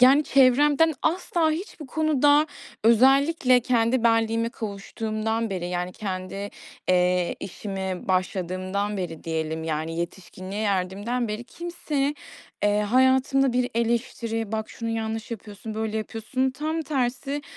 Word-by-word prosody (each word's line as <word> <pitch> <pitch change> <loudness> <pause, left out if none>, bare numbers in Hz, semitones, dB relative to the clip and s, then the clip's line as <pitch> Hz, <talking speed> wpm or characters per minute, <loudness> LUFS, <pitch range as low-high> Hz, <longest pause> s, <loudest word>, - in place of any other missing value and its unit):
yani, 275 +4 +7
çevremden 285 +4 +5
asla 335 -1 +1
hiçbir 320 -2 -5
konuda, 295 0 +3 0.4
özellikle 260 +3 +5
kendi 240 0 +2
benliğime 225 0 +2
kavuştuğumdan 220 +1 -3
beri, 180 -2 -3
yani 180 0 -2
kendi, 195 0 -5 0.4
eee, 180 -1 +2
işime 190 -1 -5
başladığımdan 185 +2 -1
beri 170 -4 -5
diyelim, 160 0 -2
yani 160 +1 -2
yetişkinliğe 185 +3 -5
erdiğimden 205 +5 -1
beri, 215 +3 -4
kimse, 300 -3 -2 0.5
eee, 205 0 +3
hayatımda 260 +4 +3
bir 250 0 +1
eleştiri, 230 -1 -1
"Bak 220 0 -2
şunu 230 - -5
yanlış 225 0 -3
yapıyorsun, 215 0 -7
böyle 220 0 -2
yapıyorsun." 225 +4 -1
Tam 310 +5 -2
tersi, 275 0 -2
225 Hz, 115 wpm, -25 LUFS, 195-265 Hz, 0.5 s, yani